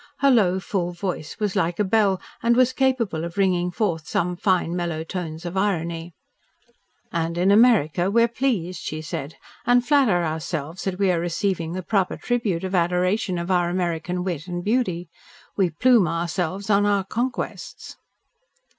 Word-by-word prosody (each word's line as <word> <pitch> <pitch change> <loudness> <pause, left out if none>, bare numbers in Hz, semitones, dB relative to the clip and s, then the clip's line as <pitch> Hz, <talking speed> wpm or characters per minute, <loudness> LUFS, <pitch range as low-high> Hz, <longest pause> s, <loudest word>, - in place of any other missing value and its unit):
Her 280 0 +4
low, 190 -6 +3
full 185 -3 -2
voice 175 -3 -4
was 210 -2 -1
like 175 -3 0
a 210 - +2
bell 200 -1 +2 0.2
and 235 0 +3
was 255 +1 +4
capable 235 -11 0
of 170 +2 -6
ringing 180 -3 +2
forth 170 -4 -2
some 175 +1 -1
fine, 180 -2 +1
mellow 170 -3 -2
tones 165 -1 -6
of 175 +2 -5
irony. 170 -4 -1 1.0
"And 165 0 -2
in 185 +3 +3
America 200 -6 +4
we 230 +3 +4
are - - +4
pleased," 220 -9 -1
she 155 0 -5
said, 150 -1 -5 0.3
"and 245 0 +3
flatter 255 -12 +3
ourselves 160 +1 -4
that 190 -2 -2
we 195 -1 +2
are 175 - +1
receiving 170 -1 -1
the 185 0 -4
proper 195 -1 0
tribute 220 -8 -1
of 190 0 -4
adoration 180 +2 +1
of 170 +2 -3
our 175 -1 +2
American 175 0 -2
wit 175 -3 -4
and 175 0 -4
beauty. 195 -6 0 0.5
We 190 -3 +2
plume 220 +4 +4
ourselves 175 +4 -2
on 205 0 +4
our 200 -1 +2
conquests." 240 +6 -4
180 Hz, 165 wpm, -23 LUFS, 170-205 Hz, 1.0 s, Her